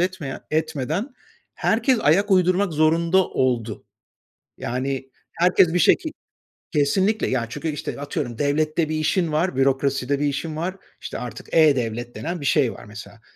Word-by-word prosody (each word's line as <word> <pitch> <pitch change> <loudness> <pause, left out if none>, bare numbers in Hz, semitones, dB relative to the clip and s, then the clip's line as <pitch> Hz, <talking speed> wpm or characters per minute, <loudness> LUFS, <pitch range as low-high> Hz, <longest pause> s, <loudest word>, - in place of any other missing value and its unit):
etmeyen 180 -7 -2
etmeden 160 - -2 0.4
herkes 235 +2 +2
ayak 195 +8 +3
uydurmak 185 0 +3
zorunda 165 +4 +3
oldu. 120 -4 -1 0.7
Yani 130 +2 -3 0.2
herkes 175 -1 +3
bir - - +3
şekil 315 - +3 0.7
Kesinlikle, 190 +9 +2
yani, 125 -3 0
çünkü, 160 - -5
işte, 145 -1 -5
atıyorum, 140 -5 -4
devlette 155 +2 0
bir 155 - -1
işin 160 +2 0
var, 155 0 0
bürokraside 135 0 +1
bir 145 - 0
işin 155 +3 -3
var, 175 +4 -3 0.3
işte - - -6
artık 120 -2 -8
e-Devlet 120 -7 +2
denen 170 0 -4
bir 140 - -5
şey 135 -6 +2
var - - -12
mesela. 105 +1 -11
155 Hz, 145 wpm, -23 LUFS, 135-175 Hz, 0.7 s, ayak